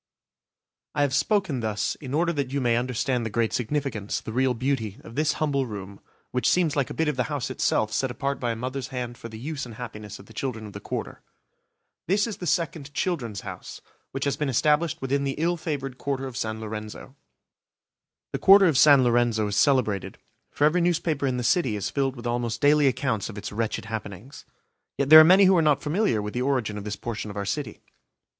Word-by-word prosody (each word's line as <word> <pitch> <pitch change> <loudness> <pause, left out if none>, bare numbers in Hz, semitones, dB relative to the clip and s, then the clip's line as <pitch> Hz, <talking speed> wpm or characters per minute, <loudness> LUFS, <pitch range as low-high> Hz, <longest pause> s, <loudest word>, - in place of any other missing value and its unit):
I 145 - +2
have 140 -2 0
spoken 155 - +1
thus 110 -2 -1
in 135 -1 -4
order 170 +2 +1
that 140 -4 -2
you 140 - -1
may 120 -3 +2
understand 125 +1 -1
the 115 - -3
great 115 +1 0
significance, 120 -4 -2
the 110 - -8
real 130 0 +2
beauty, 115 -5 -2
of 115 - -11
this 150 +3 +1
humble 140 -4 0
room, 100 -2 -8 0.3
which 125 0 +1
seems 170 -5 +2
like 140 -4 0
a - - -6
bit 160 - 0
of 150 -3 -1
the 125 - +1
house 140 -4 -3
itself 110 -4 0
set 135 - 0
apart 140 +2 -3
by 120 - -1
a - - -6
mother's 130 +3 -4
hand 125 -2 -5
for 115 - -9
the 110 - -9
use 145 +4 -5
and 120 -3 -8
happiness 105 -4 -8
of 100 - -14
the 110 - -16
children 110 -1 -4
of 105 - -10
the 100 - -7
Quarter. - - -5 0.9
This 200 +4 +2
is 225 -3 -5
the 180 - -5
second 150 -2 -2
"Children's 120 - -2
House" - - -8
5 - - -31 0.2
which 135 +1 -3
has 140 - 0
been 150 -2 -1
established 150 +4 +1
within 140 +1 0
the 135 -1 -2
ill 170 +3 +1
favoured 140 -6 -4
Quarter 135 -2 -2
of 130 -2 -7
San 110 -1 -3
Lorenzo. 110 +4 -7 1.2
The - - -2
Quarter 195 0 +7
of 155 -7 +3
San 140 -2 +7
Lorenzo 120 -2 +2
is 100 -1 -2
celebrated, 115 -8 +1 0.3
for - - -2
every 170 +4 +3
newspaper 160 -4 0
in 125 -1 -1
the 125 - -2
city 130 - +2
is 100 - -3
filled 135 -2 0
with 120 -1 -10
almost 120 -1 -2
daily 145 0 +4
accounts 130 -6 -1
of 105 - -9
its 105 - -6
wretched 110 +1 -2
happenings. 110 +3 -7 0.5
Yet 140 +1 -1
there 155 - +13
are - - +10
many 185 +5 +7
who 190 0 +5
are - - +4
not 150 -3 +2
familiar 150 - +1
with 105 - -5
the 125 - -2
origin 125 -6 0
of 100 - -9
this 105 0 -3
portion 110 -2 -5
of 100 - -8
our 100 - -2
city. 110 +3 -4
130 Hz, 220 wpm, -25 LUFS, 110-150 Hz, 1.2 s, there